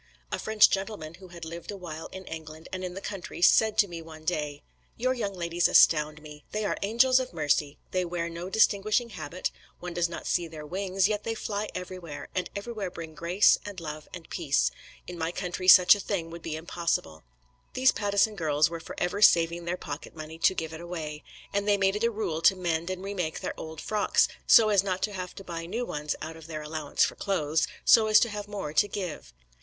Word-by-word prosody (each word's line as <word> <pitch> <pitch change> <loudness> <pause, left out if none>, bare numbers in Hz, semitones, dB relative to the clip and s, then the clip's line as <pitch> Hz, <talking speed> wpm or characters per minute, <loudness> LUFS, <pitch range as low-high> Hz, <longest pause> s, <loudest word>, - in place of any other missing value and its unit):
A - - -2
French 220 -1 +5
gentleman 195 -5 -3
who 190 - -12
had 170 -2 -9
lived 170 +1 -8
a 205 - -4
while 165 -3 -7
in 190 0 -10
England 160 -1 -8
and 185 0 -4
in 180 -1 -5
the 195 - -6
country, 195 -5 -6
said 220 +3 +5
to 205 - +5
me 170 -2 -7
one 160 -1 -12
day: 150 -3 -2 0.3
"Your 255 +2 +1
young 205 -6 -3
ladies 170 -1 +1
astound 155 -1 +4
me. 150 -1 -11
They 215 0 -1
are - - 0
angels 240 +5 +4
of 255 - -5
mercy. 145 -2 0
They 185 0 +1
wear 170 -1 -3
no 170 +2 -6
distinguishing 215 +3 +2
habit; 180 -3 -4 0.3
one 175 0 -6
does 175 0 +1
not 170 - -7
see 175 -1 0
their 155 -2 -9
wings, 190 +3 0
yet 210 -1 -2
they 225 - -2
fly 210 -1 -3
everywhere, 175 -5 -7
and 185 - -2
everywhere 205 -2 -4
bring 165 -2 -8
grace 170 +6 +4
and 205 -3 -7
love 155 -2 -7
and 170 -2 -9
peace 60 0 +1 0.3
in 180 -1 -8
my 165 +1 -1
country 185 0 -4
such 180 -1 +10
a 205 - -2
thing 175 -5 -3
would 170 0 -8
be 160 -1 -4
impossible." 160 - -2 0.5
These 260 +1 +5
Pattison 205 +1 +1
girls 155 -3 +2
were 170 - -4
for 160 - -9
ever 180 +4 -1
saving 170 -3 +5
their 175 +1 -2
pocket 150 -1 -7
money 160 +1 -8
to 190 - +4
give 160 -2 -4
it 160 - -7
away, 160 -4 -6 0.3
and 200 0 0
they 205 -1 +4
made 195 0 +2
it 210 - -2
a 235 - +4
rule 205 -8 -3
to 190 - +6
mend 170 -2 -1
and 185 0 -4
remake 185 -5 -3
their - - -3
old 160 -1 -8
frocks, 210 +3 +2 0.2
so 220 -2 +7
as 205 -3 +5
not 190 -1 -2
to 210 - 0
have 185 -2 -6
to 195 - -9
buy 165 -2 -6
new 230 +7 -2
ones 150 -5 -3
out 160 +1 -6
of 160 -1 -12
their 155 -2 -5
allowance 150 -1 0
for - - +1
clothes, 155 -6 0 0.2
so 220 -2 +7
as 215 0 +7
to 235 - +2
have 205 -1 -5
more 195 -8 -5
to 205 - +4
give. 180 - -5
175 Hz, 225 wpm, -28 LUFS, 160-200 Hz, 0.5 s, such